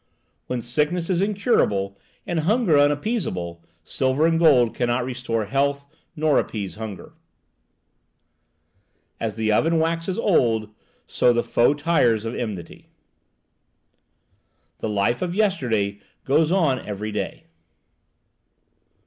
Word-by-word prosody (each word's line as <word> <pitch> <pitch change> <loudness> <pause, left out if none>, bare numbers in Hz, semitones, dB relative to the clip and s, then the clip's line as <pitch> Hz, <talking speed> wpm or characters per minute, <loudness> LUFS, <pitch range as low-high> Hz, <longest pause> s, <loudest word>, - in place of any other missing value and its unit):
"When 125 -1 -2
sickness 155 +9 0
is 180 0 +1
incurable 190 - +1 0.3
and 175 -2 -1
hunger 195 +1 +2
unappeasable, 145 - -1 0.2
silver 130 - 0
and 165 0 +2
gold 130 -8 +5
cannot 120 0 0
restore 120 -3 -2
health 140 +5 0 0.3
nor 155 -2 +2
appease 100 -4 -4
hunger." 110 -3 -8 2.1
"As 110 -2 -3
the 110 -1 0
oven 165 +10 +2
waxes 165 +3 -1
old, 115 - +1 0.3
so 125 - +2
the 120 0 +1
foe 120 +5 +2
tires 145 -8 +2
of 115 - -3
enmity." 100 -8 -6 1.9
"The - - -3
life 105 +4 0
of 180 -1 -2
yesterday 120 - 0 0.3
goes 155 +4 +2
on 160 -9 +2
every 105 +1 -5
day." 100 -2 -4
130 Hz, 110 wpm, -23 LUFS, 110-165 Hz, 2.1 s, gold